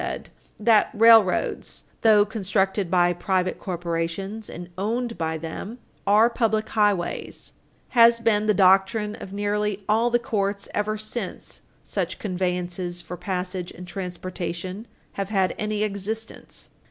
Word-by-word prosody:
694, -, -, -6 dB, 0.2 s
said: 210 Hz, -, -11 dB
"That 220 Hz, -2 st, +5 dB
railroads, 225 Hz, -5 st, +4 dB, 0.2 s
though 210 Hz, -2 st, +6 dB
constructed 195 Hz, -2 st, 0 dB
by 175 Hz, -1 st, +3 dB
private 185 Hz, +1 st, -1 dB
corporations 175 Hz, +4 st, -3 dB
and 175 Hz, +1 st, -8 dB
owned 230 Hz, +5 st, -2 dB
by 160 Hz, -1 st, -2 dB
them, 165 Hz, +8 st, -6 dB, 0.3 s
are 210 Hz, +3 st, +6 dB
public 220 Hz, -2 st, 0 dB
highways 205 Hz, -5 st, -1 dB, 0.4 s
has 235 Hz, -1 st, +6 dB
been 215 Hz, -2 st, +2 dB
the 210 Hz, -, +4 dB
doctrine 195 Hz, +3 st, +3 dB
of 190 Hz, -, -9 dB
nearly 205 Hz, 0 st, -1 dB
all 225 Hz, +3 st, +3 dB
the 240 Hz, -, +3 dB
courts 200 Hz, -3 st, -2 dB
ever 215 Hz, +1 st, -1 dB
since 215 Hz, +3 st, -5 dB, 0.2 s
such -, -, -3 dB
conveniences 180 Hz, -2 st, -2 dB
for 180 Hz, -, -7 dB
passage 180 Hz, 0 st, -3 dB
and 180 Hz, -, -10 dB
transportation 180 Hz, +2 st, -5 dB, 0.2 s
have 195 Hz, -1 st, -4 dB
had 190 Hz, -3 st, +1 dB
any 215 Hz, 0 st, -1 dB
existence. 215 Hz, +2 st, -5 dB
200 Hz, 130 wpm, -24 LUFS, 180-215 Hz, 0.4 s, though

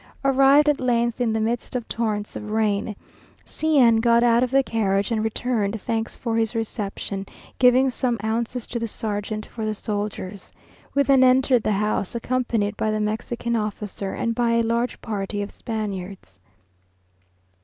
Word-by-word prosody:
Arrived 275 Hz, +2 st, +5 dB
at 295 Hz, -1 st, +3 dB
length 235 Hz, -1 st, +1 dB
in 235 Hz, -2 st, +2 dB
the 220 Hz, -, 0 dB
midst 230 Hz, +3 st, -2 dB
of 245 Hz, -2 st, -3 dB
torrents 215 Hz, -3 st, -2 dB
of 210 Hz, -, -6 dB
rain, 215 Hz, -1 st, 0 dB, 0.5 s
C 315 Hz, -1 st, 0 dB
n 235 Hz, -4 st, +6 dB
got 235 Hz, +1 st, +4 dB
out 235 Hz, 0 st, +4 dB
of 250 Hz, -, +1 dB
the 270 Hz, +1 st, +3 dB
carriage 200 Hz, -3 st, 0 dB
and 220 Hz, -1 st, 0 dB
returned 220 Hz, -2 st, -1 dB
thanks 225 Hz, +2 st, -3 dB
for 230 Hz, -2 st, -2 dB
his 225 Hz, 0 st, 0 dB
reception, 205 Hz, -3 st, -4 dB, 0.4 s
giving 255 Hz, +1 st, +5 dB
some 245 Hz, -1 st, -1 dB
ounces 230 Hz, +2 st, -2 dB
to 235 Hz, -, -4 dB
the 230 Hz, -, -2 dB
sergeant 215 Hz, 0 st, -4 dB
for 225 Hz, -, -7 dB
the 215 Hz, 0 st, -1 dB
soldiers. 205 Hz, -2 st, -4 dB, 0.4 s
We 280 Hz, -, +4 dB
then 270 Hz, -2 st, +5 dB
entered 255 Hz, -1 st, +4 dB
the 215 Hz, -, 0 dB
house, 210 Hz, +1 st, -1 dB
accompanied 235 Hz, -4 st, -1 dB
by 215 Hz, -, 0 dB
the 215 Hz, 0 st, 0 dB
Mexican 235 Hz, +2 st, -2 dB
officer, 210 Hz, -2 st, -3 dB
and 230 Hz, -, -1 dB
by 235 Hz, 0 st, +1 dB
a 230 Hz, 0 st, +3 dB
large 235 Hz, +2 st, -1 dB
party 205 Hz, -2 st, -3 dB
of 200 Hz, -, -7 dB
Spaniards. 195 Hz, -, -6 dB
225 Hz, 165 wpm, -23 LUFS, 210-245 Hz, 0.5 s, n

